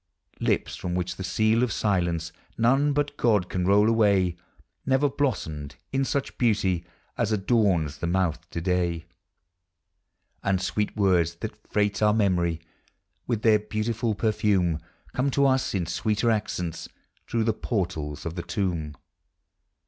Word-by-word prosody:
Lips - - 0
from 90 0 -4
which 90 0 -2
the 95 - -5
seal 110 +5 +2
of 125 -3 +1
silence 85 -5 0 0.3
None 135 +6 +3
but 145 0 -1
(Jod 105 -7 +2
can 90 -1 -1
roll 105 +2 +5
away 100 -6 +3 0.5
Never 135 +2 +3
blossomed 80 - -2 0.2
in 135 0 +1
such 140 0 -2
beauty 100 -7 +2 0.4
As 115 -2 +1
adorns 95 - +1
the 85 - -2
mouth 85 -3 -1
to 85 - -4
day; 85 -2 0 1.4
And 95 -2 +1
sweet 105 +3 -2
words 90 -4 +3
that - - -4 0.2
freight 105 0 +1
our 105 0 +4
memory 85 -6 +1 0.7
With 115 -2 -1
their 110 -3 +5
beautiful 110 +1 -2
perfume 100 -6 +1 0.3
Come 130 +2 +1
to 140 +1 +2
us 130 -5 +2
in 90 -3 0
sweeter 110 +7 0
accents 90 -6 -3 0.4
Through 115 -1 0
the 110 0 +2
portals 85 - -3
of 85 - -3
the 85 - -4
tomb. 85 -5 -2
100 Hz, 140 wpm, -26 LUFS, 85-115 Hz, 1.4 s, roll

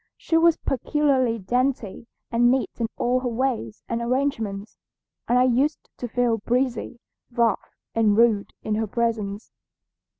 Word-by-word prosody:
She 330 - -2
was 330 0 +5
peculiarly 265 -3 +1
dainty 240 0 -1 0.2
and 240 +1 +4
neat 260 +1 +1
in 230 - 0
all 250 +1 +1
her 255 - -3
ways 235 - -2
and 235 0 -2
arrangements, 230 -5 -2 0.5
and 245 - +3
I 250 - +5
used 260 +4 +1
to 245 - -4
feel 235 -1 +1
breezy, 245 +1 -1 0.3
rough, 235 -2 0 0.2
and 215 -2 +3
rude 225 -3 +3
in 215 - -1
her 220 +1 0
presence. 215 -2 -2
235 Hz, 140 wpm, -24 LUFS, 225-255 Hz, 0.5 s, was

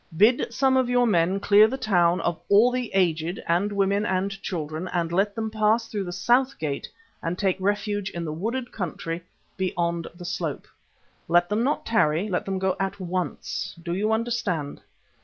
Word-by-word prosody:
Bid 225 +5 +4
some 265 +2 +2
of 255 -2 +2
your 245 0 +3
men 185 -2 +2
clear 210 +2 +6
the 260 +4 -3
town 180 -8 +2
of 170 -1 -1
all 215 +5 +6
the 250 -1 -2
aged 170 -1 +1
and 180 +5 +1
women 200 0 +1
and 190 0 0
children 160 0 -4
and 170 -2 -1
let 195 +3 +1
them 220 -1 -3
pass 220 +1 +2
though 205 -2 -3
the 175 - -5
south 255 +7 +2
gate 145 -3 -3 0.3
and 170 +2 -2
take 190 -2 +1
refuge 205 0 -1
in 170 -1 -5
the 155 - -3
wooded 235 +9 -3
country 170 -3 -4 0.4
beyond 170 -2 -1
the 175 0 -10
slope. 175 -4 -3 0.6
Let 175 +1 +3
them 210 +2 +1
not 280 +4 0
tarry. 190 -5 +2
Let 180 - -1
them 195 -1 -2
go 190 0 0
at 195 +1 -2
once. 180 -1 -3
Do 170 - -3
you 210 +4 0
understand?" 220 -10 -1
195 Hz, 180 wpm, -25 LUFS, 175-220 Hz, 0.6 s, clear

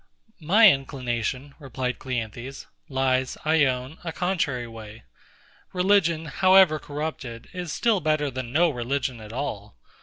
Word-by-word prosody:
My 200 +8 +6
inclination, 130 0 -3
replied 130 -3 -4
CLEANTHES, 125 +1 -5 0.2
lies, 130 -1 0
I 155 -1 +4
own, 130 +3 -3
a 165 - -3
contrary 160 -9 -1
way. 110 -1 -11 0.7
Religion, 180 -3 +2
however 185 0 +5
corrupted, 145 -6 -6
is 180 -3 -5
still 225 +1 +2
better 155 -3 0
than 130 -2 -5
no 165 +4 +3
religion 125 -1 -3
at 105 0 -10
all. 110 - -5
135 Hz, 125 wpm, -25 LUFS, 125-160 Hz, 0.7 s, My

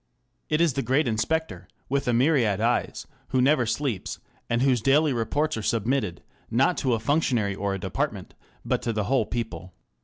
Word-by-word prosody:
It 155 +1 +2
is 170 -5 +3
the 135 - -1
great 135 +3 +1
inspector, 160 +9 -1 0.2
with 140 0 -1
a - - +3
myriad 120 -5 +2
eyes, 120 +2 0 0.2
who 130 - 0
never 130 -2 +3
sleeps, 125 -5 -2 0.3
and 115 +2 +1
whose 130 -4 +3
daily 145 +4 +3
reports 125 +6 -1
are - - -3
submitted, 110 -4 -1 0.3
not 135 +9 +2
to 130 -4 +1
a - - -3
functionary 115 -5 +1
or 100 0 -2
a - - -5
department, - - -3 0.3
but - - 0
to 115 - -2
the 105 -1 -1
whole 120 0 +1
people. 115 -6 -5
125 Hz, 180 wpm, -25 LUFS, 110-140 Hz, 0.3 s, is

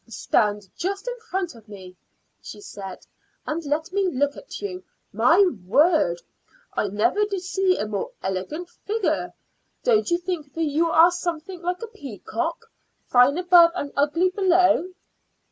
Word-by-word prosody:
"Stand 210 -2 0
just 395 +5 -3
in - - -2
front 370 -2 -2
of 225 -2 -17
me," 185 -3 -11 0.5
she - - -10
said, 195 - -9 0.4
"and 325 +2 -3
let 315 +5 -2
me 395 -1 +1
look 285 -2 0
at - - -9
you. 185 -2 -5 0.3
My 290 - +5 0.2
word! 265 - +3 0.5
I - - 0
never 210 - +1
did 395 -3 -4
see 370 0 +1
a - - -2
more 210 -2 -3
elegant 190 - -3
figure. 420 +3 -2 0.5
Don't 440 -5 +3
you 345 - +3
think 345 -5 -5
that 330 - -1
you 315 +2 +1
are 330 +2 +6
something 350 0 -4
like 360 +4 -3
a - - -4
peacock 305 - -5 0.4
fine 250 +4 +4
above 350 -2 +6
and 285 -5 -4
ugly 320 +6 +2
below?" 370 -2 +3
330 Hz, 150 wpm, -24 LUFS, 230-365 Hz, 0.5 s, are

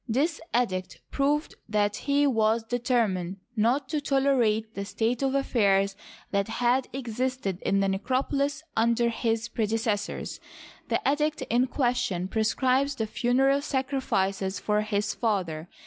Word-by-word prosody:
This 285 +8 0
edict 185 -7 -1
proved 290 +2 0 0.2
that 205 -1 +1
he 285 +1 +1
was 225 -3 +2
determined 225 -6 0 0.2
not 245 +6 +2
to 305 -2 -1
tolerate 245 -6 +2
the 200 - -4
state 225 +5 -1
of 270 0 +1
affairs 200 -7 +2 0.4
that 200 -1 +1
had 245 +3 +1
existed 250 -5 -3
in 195 0 +1
the 195 - +2
necropolis 275 +8 -1
under 235 +1 +3
his 225 -1 -1
predecessors. 220 -2 -2 0.5
The - - +2
edict 300 0 +1
in 245 +2 +3
question 245 -9 0
prescribes 260 +6 +1
the 225 - -1
funereal 265 +5 +2
sacrifices 200 -9 -1
for 210 0 +1
his 210 0 -1
father. 180 -8 -2
235 Hz, 130 wpm, -27 LUFS, 210-265 Hz, 0.5 s, under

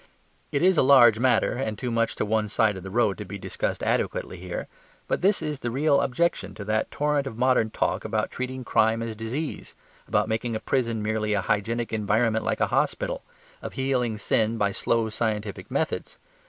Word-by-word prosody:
It 140 - 0
is 185 -1 +4
a - - +6
large 125 -5 +7
matter 130 +1 +3
and 110 -4 -3
too 125 -2 -3
much 115 0 0
to - - -1
one 110 0 +1
side 110 -1 +2
of 95 - -7
the 95 - -7
road 105 -1 +1
to - - -3
be 100 0 -7
discussed 95 - -3
adequately 95 - -1
here; 90 -1 -5 0.4
but - - -1
this 195 +3 +2
is 150 -2 -3
the 120 - -3
real 140 +3 +2
objection 155 +6 0
to 100 - -7
that 110 +1 0
torrent 145 -1 0
of 115 - -7
modern 125 -3 +3
talk - - -1
about 110 0 -1
treating 130 0 -4
crime 115 -1 +2
as 115 -1 -4
disease, 120 +8 -5 0.3
about - - +1
making 110 +1 -2
a - - -1
prison 115 -2 -1
merely 110 0 0
a 100 - +1
hygienic 115 +3 -1
environment 110 +1 +1
like - - -1
a - - +5
hospital, - - 0 0.4
of - - -6
healing 125 -4 0
sin 110 +2 +1
by 100 -2 +1
slow 115 +2 0
scientific 105 -3 -3
methods. 145 +5 -2
115 Hz, 195 wpm, -26 LUFS, 110-130 Hz, 0.4 s, large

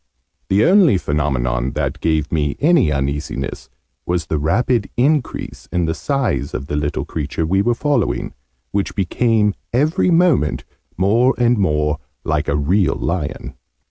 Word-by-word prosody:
The 100 +3 +3
only 180 - +5
phenomenon, 65 -5 -1
that - - -2
gave 80 -2 0
me 75 -3 0
any 155 - +3
uneasiness, 70 -1 -3 0.3
was 85 -3 -1
the 80 -1 -2
rapid 105 - +1
increase 140 +2 -1
in 90 -1 0
the 80 - 0
size 130 - -2
of 70 - -4
the 75 - -4
little 75 0 -2
creature 80 +1 -3
we 95 +4 +2
were 120 +4 +1
following, 145 +3 -1 0.4
which 100 -1 -2
became 105 +2 +1 0.2
every 155 +9 +2
moment 165 - +2 0.3
more 115 +8 +3
and 120 0 +3
more 75 -7 0 0.3
like - - 0
a 70 - +1
real 85 +6 +2
lion. 75 -5 -3
90 Hz, 140 wpm, -19 LUFS, 75-120 Hz, 0.4 s, only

